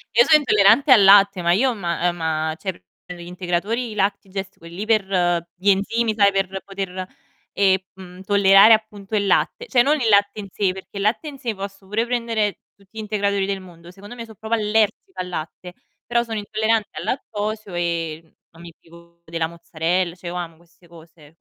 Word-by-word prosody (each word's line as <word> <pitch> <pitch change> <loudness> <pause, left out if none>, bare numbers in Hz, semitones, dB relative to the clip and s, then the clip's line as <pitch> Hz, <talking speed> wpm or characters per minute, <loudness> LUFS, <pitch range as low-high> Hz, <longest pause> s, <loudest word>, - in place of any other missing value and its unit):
Io 240 - +6
sono 310 -1 +6
intollerante 230 +2 +4
al 210 -5 +8
latte, 200 -1 +6
ma 170 0 +2
io 250 +5 +2
ma 175 -3 -2
ehm, 175 - -1
ma, 160 -1 -2
cioè, 190 - -3 0.3
prendo 175 -1 -9
degli - - -11
integratori, 190 +7 -2
i - - -7
LactiGest, 195 -1 -3
quelli 170 +5 -8
per 215 -3 +2 0.5
gli 190 +3 0
enzimi, 220 +3 +1
sai, 200 -2 +4
per 195 0 -2
poter, 190 -2 -5 0.5
ehm, 190 -1 +3 0.2
mhmm, 185 -1 -12
tollerare 200 +2 +6
appunto 215 -1 -2
il 200 - +1
latte. 475 - 0
Cioè 245 - +3
non 295 +2 +2
il 230 - +1
latte 205 0 +3
in 200 - -9
sé, 195 -3 0
perché 190 +1 -11
il - - -3
latte 225 +9 0
in 280 - -11
sé 235 -4 -4
posso 195 0 -8
pure 215 +4 -1
prendere 230 -4 -1 0.2
tutti 200 +2 -20
gli - - -4
integratori 200 -2 -1
del 195 -1 -3
mondo, 175 -2 -14
secondo 205 +5 -12
me 230 - -7
so' 220 -1 -15
proprio 220 +3 -6
allergica 210 -3 -1
al 180 - -6
latte, 175 +1 -7 0.3
però 235 0 +1
sono 225 -2 -4
intollerante 220 +1 -1
al 155 - -6
lattosio 215 -3 -4
e 170 -2 -2
n 160 - -30 0.2
non 165 - -16
mi 170 -1 -11
privo 170 0 -19
della 165 0 -2
mozzarella. 170 +1 -2
Cioè 180 -1 -11
io 175 - -5
amo 170 -2 -6
queste 170 +1 -25
cose 160 -2 -18
195 Hz, 200 wpm, -21 LUFS, 175-215 Hz, 0.5 s, al